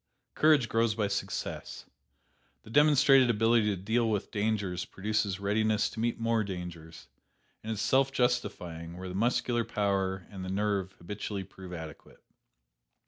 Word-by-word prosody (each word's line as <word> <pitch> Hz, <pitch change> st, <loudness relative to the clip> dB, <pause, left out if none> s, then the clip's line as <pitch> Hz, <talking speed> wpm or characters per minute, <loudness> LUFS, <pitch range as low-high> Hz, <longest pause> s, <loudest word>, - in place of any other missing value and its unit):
Courage 150 Hz, -6 st, +4 dB
grows 115 Hz, -2 st, +1 dB
by 105 Hz, -2 st, 0 dB
success. 95 Hz, -10 st, -4 dB, 0.8 s
The 110 Hz, -, -13 dB
demonstrated 140 Hz, -2 st, +6 dB
ability 115 Hz, 0 st, +3 dB
to 105 Hz, -, +1 dB
deal 110 Hz, +5 st, 0 dB
with 105 Hz, -3 st, -2 dB
dangers 100 Hz, -4 st, -1 dB
produces 100 Hz, -1 st, -2 dB
readiness 105 Hz, +1 st, +1 dB
to -, -, -8 dB
meet 115 Hz, +1 st, -1 dB
more 115 Hz, -1 st, +1 dB
dangers, 90 Hz, -4 st, -8 dB, 0.5 s
and 110 Hz, +1 st, -3 dB
is 105 Hz, -, -4 dB
self 135 Hz, +1 st, +3 dB
justifying 100 Hz, -10 st, -2 dB
where 95 Hz, 0 st, -6 dB
the -, -, -6 dB
muscular 120 Hz, +3 st, +1 dB
power 95 Hz, -4 st, -1 dB
and 95 Hz, -2 st, -7 dB
the 95 Hz, -, -5 dB
nerve 100 Hz, -1 st, -1 dB
habitually 100 Hz, +2 st, -5 dB
prove 95 Hz, -1 st, -12 dB
adequate. 80 Hz, -3 st, -10 dB
105 Hz, 140 wpm, -30 LUFS, 95-115 Hz, 0.8 s, demonstrated